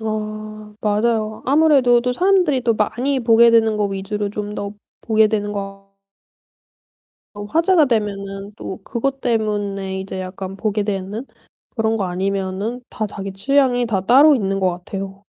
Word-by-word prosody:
아. 215 -1 -5
맞아요. 215 0 0
아무래도 275 -4 +4
또 250 +1 -1
사람들이 355 -4 +2
많이 255 +5 0
보게 235 0 +5
되는 225 -2 +3
거 210 - +1
위주로 200 +1 -3
좀 210 0 -5
더 200 -1 -4 0.3
보게 220 -1 +3
되는 205 -1 -2
것 195 0 -7 1.4
어 205 - -6
화제가 330 - +3
되면은 200 -3 -3
또 190 -3 -7
그것 270 +3 -2
때문에 205 -4 -1
이제 190 0 -6
약간 185 +1 -6
보게 210 0 -1
되는 205 +4 -4 0.5
그런 225 -1 0
거 205 - -1
아니면은 195 +5 -2
다 215 -3 -4
자기 195 -1 -6
취향이 245 +3 +2
다 205 -4 0
따로 275 +8 +6
있는 195 -3 -1
것 185 -1 +2
같아요. 195 +2 -7
215 Hz, 285 characters per minute, -20 LUFS, 195-240 Hz, 1.4 s, 따로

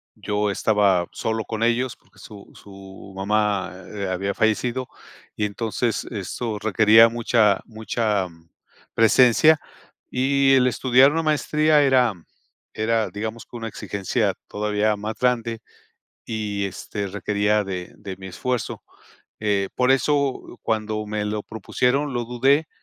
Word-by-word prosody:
yo 105 0 -1
estaba 100 -3 +2
solo 110 0 -2
con 110 0 -3
ellos 120 +2 +1
porque - - -25
su 105 -2 -13
su 95 -1 -13
mamá, 100 -1 0 0.2
eh, 100 -1 -3
había 95 +2 -2
fallecido, 120 +4 0 0.5
y 105 - -1
entonces 115 +2 -2
eso 105 +1 -4
requería 110 +2 +6
mucha 115 -3 +2
mucha 110 -3 -1 0.7
presencia 125 +7 +5 0.5
y 135 +1 +3
el 130 -1 +5
estudiar 130 +3 +4
una 165 +1 -1
maestría 155 0 +2
era 130 -5 +3 0.6
era, 110 0 +1
digamos, 110 +2 -6
que - - -14
una 115 -1 -5
exigencia 100 -2 -2 0.2
todavía 105 0 0
más 105 +2 -5
grande 115 -2 0 0.6
y, 105 -3 -3
este, 100 +1 -5
requería 105 +1 0
de 90 -2 -6
de 95 -3 -8
mi 95 0 -9
esfuerzo. 125 +6 -3 0.6
Eh, 100 -2 0
por 125 0 +2
eso, 135 -2 0
cuando 110 -1 -2
me 105 0 -3
lo 105 0 -3
propusieron, 125 +7 -1
lo 120 -1 -1
dudé, 135 +6 +2
110 Hz, 130 wpm, -23 LUFS, 105-125 Hz, 0.7 s, requería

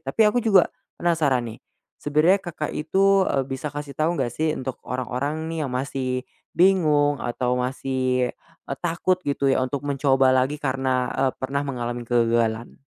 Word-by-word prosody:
Tapi - - -3
aku 245 +4 +1
juga 195 -5 +5 0.3
penasaran, 155 -8 +1
nih, 110 - -11 0.4
sebenarnya 155 +7 +3
Kakak 160 -4 -5
itu, 195 +5 +3
eee, 135 -1 0
bisa 135 +2 -4
kasih 145 -1 -6
tahu 160 +3 +1
enggak, 125 -4 -1
sih, 155 +2 0
untuk 130 -1 -4
orang-orang, 140 +5 -3
nih, 160 -3 -2
yang - - -7
masih 130 -1 -2 0.3
bingung, 155 -6 +4
atau 125 +1 -1
masih, 130 0 -1 0.4
eee, 140 - -3
takut 175 +2 0
gitu, 140 -1 0
ya, - - +2
untuk 140 +2 -4
mencoba 135 -2 +3
lagi 130 +3 +2
karena, 130 -2 0
eee, 130 -1 +1
pernah 135 +2 -1
mengalami 120 -3 -4
kegagalan? 115 -1 0
135 Hz, 160 wpm, -24 LUFS, 130-155 Hz, 0.4 s, juga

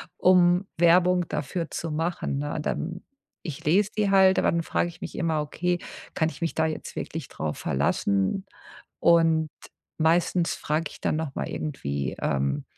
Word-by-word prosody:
um 180 0 +4
Werbung 175 +1 +4
dafür 165 +3 -3
zu 165 - -4
machen, 165 -2 -2
ne? 145 +2 -3
Dann 170 +4 -3 0.4
ich 150 -5 -7
lese 190 +7 +3
die 210 -2 +2
halt, 190 -1 +5
aber - - +3
dann 170 0 0
frage 175 - 0
ich 170 - -11
mich - - -6
immer: 160 -3 0
„Okay, 175 +4 -1 0.3
kann 160 -1 +1
ich - - -11
mich 165 - -1
da 160 - +2
jetzt 160 -1 -4
wirklich 160 -4 -5
drauf 75 -1 -4
verlassen?” 100 - 0 0.5
Und 165 -2 +4 0.5
meistens 170 +2 +2
frage 155 +1 -1
ich - - -13
dann - - 0
nochmal 155 -4 -3
irgendwie, 70 - -3
ähm, 70 +1 0
165 Hz, 160 wpm, -26 LUFS, 150-175 Hz, 0.5 s, halt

